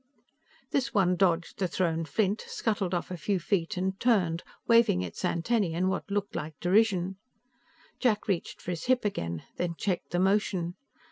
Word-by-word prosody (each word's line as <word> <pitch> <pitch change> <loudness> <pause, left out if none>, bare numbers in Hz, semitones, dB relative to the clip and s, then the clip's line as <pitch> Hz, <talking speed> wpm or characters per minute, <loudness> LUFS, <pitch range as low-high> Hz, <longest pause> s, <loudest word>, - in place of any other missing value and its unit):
This 270 -2 0
one 180 -3 +4
dodged 175 -2 +1
the 190 - +1
thrown 165 -2 0
flint, 200 +6 0
scuttled 205 -5 -1
off 175 - -3
a 180 - -3
few 195 +3 0
feet 180 +1 -1
and 190 +1 -1
turned, 185 -9 +2 0.3
waving 230 - +5
its 90 - -7
antennae 180 -1 +1
in 185 +2 +1
what 190 - -3
looked 200 0 -2
like 150 0 -5
derision. 190 -1 +2 0.8
Jack 220 -5 +1
reached 190 -5 -2
for 180 - -3
his 165 -2 -4
hip 250 -2 +2
again, 85 - -2
then 175 -1 -1
checked 185 -3 -2
the 175 - -1
motion. 190 -2 +1
185 Hz, 165 wpm, -29 LUFS, 170-205 Hz, 0.8 s, waving